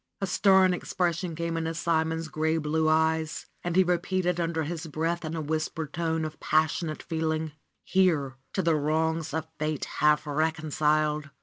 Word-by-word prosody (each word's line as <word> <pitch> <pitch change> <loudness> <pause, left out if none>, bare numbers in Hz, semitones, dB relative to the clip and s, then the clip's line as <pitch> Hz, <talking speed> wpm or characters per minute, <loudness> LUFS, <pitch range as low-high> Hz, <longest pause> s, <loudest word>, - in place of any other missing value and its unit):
A 195 - 0
stern 190 0 +4
expression 175 -1 -1
came 170 0 -2
into 165 0 -2
Simon's 160 -1 0
gray 160 +1 0
blue 155 0 +1
eyes, 160 0 +1 0.2
and 175 -1 -2
he 190 - +6
repeated 180 0 0
under 165 -1 0
his 165 +2 -4
breath 165 +3 -2
in 160 +1 -4
a 160 - -2
whispered 155 0 -3
tone 160 -1 -1
of 155 - -7
passionate 155 +1 0
feeling: 160 -1 -1 0.4
^'Here 165 -8 +2 0.2
to 190 - 0
the 165 -1 +3
wrongs 160 +1 0
of 160 +1 -3
fate 155 -1 -1
half 150 0 +2
reconciled. 155 -1 0
160 Hz, 160 wpm, -27 LUFS, 155-170 Hz, 0.4 s, he